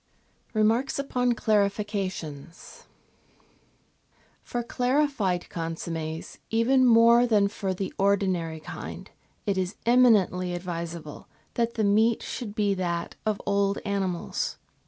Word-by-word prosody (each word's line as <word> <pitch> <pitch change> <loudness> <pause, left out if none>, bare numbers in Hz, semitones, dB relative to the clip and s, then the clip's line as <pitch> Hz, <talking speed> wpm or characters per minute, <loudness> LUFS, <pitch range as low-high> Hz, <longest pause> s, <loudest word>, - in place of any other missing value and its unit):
Remarks 225 +5 +2
upon 250 -3 0
Clarifications 200 - -2 1.6
For 240 0 -4
clarified 250 -8 0
consommes, 165 -1 -5
even 255 +3 +3
more 235 +1 +6
than 210 -3 +4
for 200 -1 -3
the 190 0 -4
ordinary 185 -5 +1
kind, - - -8 0.3
it 195 -2 0
is 185 +1 -2
eminently 210 -7 +4
advisable 170 -3 -6 0.3
that 235 -1 -1
the 220 - 0
meat 220 +3 +3
should 215 -5 -6
be 205 -3 +2
that 175 -2 -3
of 215 -2 0
old 200 0 +1
animals. 195 -4 -2
200 Hz, 105 wpm, -26 LUFS, 180-230 Hz, 1.6 s, more